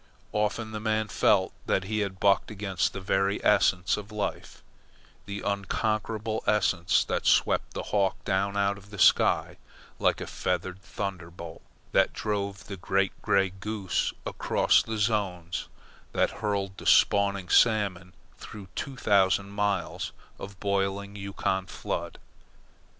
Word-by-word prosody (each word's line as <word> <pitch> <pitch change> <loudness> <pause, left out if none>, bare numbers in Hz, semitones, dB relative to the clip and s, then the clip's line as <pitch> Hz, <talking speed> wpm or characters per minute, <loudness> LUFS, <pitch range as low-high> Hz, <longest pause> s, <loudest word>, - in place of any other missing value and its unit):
Often 105 +1 -1
the 110 - -4
man 110 0 0
felt 95 -2 +3
that 95 - +1
he 110 +3 -2
had 100 -2 -3
bucked 100 -1 +3
against 95 -4 -1
the - - -6
very 95 +1 +1
essence 95 -3 +3
of 105 +1 -8
life 105 -2 -4 0.6
the 100 0 -5
unconquerable 110 +2 -2
essence 95 -5 +3
that - - -1
swept - - +2
the - - -3
hawk 100 -2 +2
down 100 +1 0
out 100 0 +1
of 100 0 -18
the 100 - -9
sky - - +4 0.4
like - - +2
a - - -4
feathered 90 +1 -3
thunderbolt, 90 -5 -6 0.3
that - - +3
drove 100 -1 -3
the 100 - -7
great 95 +2 0
grey 95 -1 +2
goose 100 -1 -2
across - - +2
the 110 0 -4
zones, 95 -6 -1 0.5
that - - +2
hurled 100 -2 -2
the - - -6
spawning 100 -2 +4
salmon 95 -5 +3 0.3
through 100 -3 -10
two 135 -2 -5
thousand 100 -2 +2
miles 100 -2 -2 0.3
of 100 -1 -9
boiling 100 0 -1
Yukon 100 -1 -2
flood. - - -4
100 Hz, 135 wpm, -28 LUFS, 95-105 Hz, 0.6 s, sky